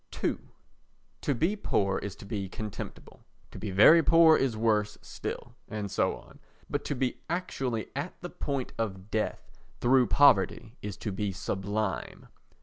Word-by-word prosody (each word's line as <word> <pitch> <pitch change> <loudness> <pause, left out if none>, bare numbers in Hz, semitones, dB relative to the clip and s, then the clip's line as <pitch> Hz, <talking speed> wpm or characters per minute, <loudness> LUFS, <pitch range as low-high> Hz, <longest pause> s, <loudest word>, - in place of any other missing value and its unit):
ii - - +2 0.9
To 140 - 0
be 165 - +1
poor 100 - 0
is 100 - -6
to - - -12
be 100 -3 -4
contemptible, 105 +1 -8 0.3
to - - -9
be 105 - -4
very 105 - +7
poor 165 0 +7
is 130 -6 0
worse 105 -2 +1
still, - - -6
and 105 -2 -4
so - - +1
on; - - -16 0.3
but - - -2
to 145 - -2
be 130 -1 -1
actually 135 - -2
at 145 +6 -4
the 175 - -6
point 140 -3 -3
of 100 -2 -4
death 110 -1 -3 0.2
through 125 0 +4
poverty 115 -4 +4
is 105 -2 -5
to 105 - -4
be 100 +1 -2
sublime. 95 +2 -3
110 Hz, 155 wpm, -29 LUFS, 100-140 Hz, 0.9 s, very